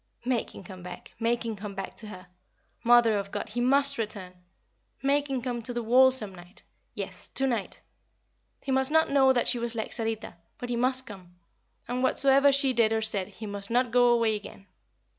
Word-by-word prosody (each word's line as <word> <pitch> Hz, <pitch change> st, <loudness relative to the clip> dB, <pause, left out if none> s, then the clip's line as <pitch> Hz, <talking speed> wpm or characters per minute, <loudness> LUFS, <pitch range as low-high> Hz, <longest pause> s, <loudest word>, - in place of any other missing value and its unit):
Make 245 Hz, -3 st, -2 dB
him -, -, -10 dB
come 185 Hz, 0 st, -11 dB
back 180 Hz, 0 st, -10 dB
make 235 Hz, +1 st, 0 dB
him 225 Hz, -1 st, -3 dB
come 200 Hz, 0 st, -8 dB
back 195 Hz, 0 st, -6 dB
to 220 Hz, -, -10 dB
her. 185 Hz, -3 st, -10 dB, 0.6 s
Mother 235 Hz, -3 st, +4 dB
of 200 Hz, 0 st, -6 dB
God, 210 Hz, -, -5 dB
he 240 Hz, +3 st, -3 dB
must 280 Hz, +1 st, +2 dB
return! 205 Hz, -4 st, -5 dB, 0.7 s
Make 285 Hz, +1 st, +1 dB
him 260 Hz, -3 st, -3 dB
come 245 Hz, -2 st, -3 dB
to 245 Hz, +2 st, -3 dB
the 240 Hz, -, -2 dB
wall 255 Hz, +3 st, +5 dB
some 220 Hz, -7 st, -3 dB
night 180 Hz, +3 st, -15 dB, 0.3 s
yes, -, -, -7 dB
to 270 Hz, -, +1 dB
night. 235 Hz, -6 st, -3 dB, 0.8 s
He 270 Hz, -, -3 dB
must 265 Hz, 0 st, +3 dB
not 320 Hz, 0 st, +2 dB
know 270 Hz, -1 st, +5 dB
that 245 Hz, -2 st, +1 dB
she 245 Hz, -, +4 dB
was 235 Hz, 0 st, -1 dB
like 220 Hz, -, -4 dB
Sarita, 225 Hz, -3 st, -4 dB, 0.2 s
but 245 Hz, -, -7 dB
he 240 Hz, -, -1 dB
must 255 Hz, +2 st, +3 dB
come; 185 Hz, -6 st, -12 dB, 0.5 s
and 250 Hz, +1 st, -3 dB
whatsoever 275 Hz, +1 st, +4 dB
she 275 Hz, -1 st, +3 dB
did 225 Hz, -2 st, +2 dB
or 220 Hz, 0 st, 0 dB
said 200 Hz, -4 st, +1 dB
he 210 Hz, +2 st, -10 dB
must 200 Hz, -1 st, -3 dB
not 245 Hz, +1 st, +1 dB
go 245 Hz, 0 st, +4 dB
away 230 Hz, -2 st, +2 dB
again. 205 Hz, -1 st, -10 dB
235 Hz, 205 wpm, -27 LUFS, 210-260 Hz, 0.8 s, wall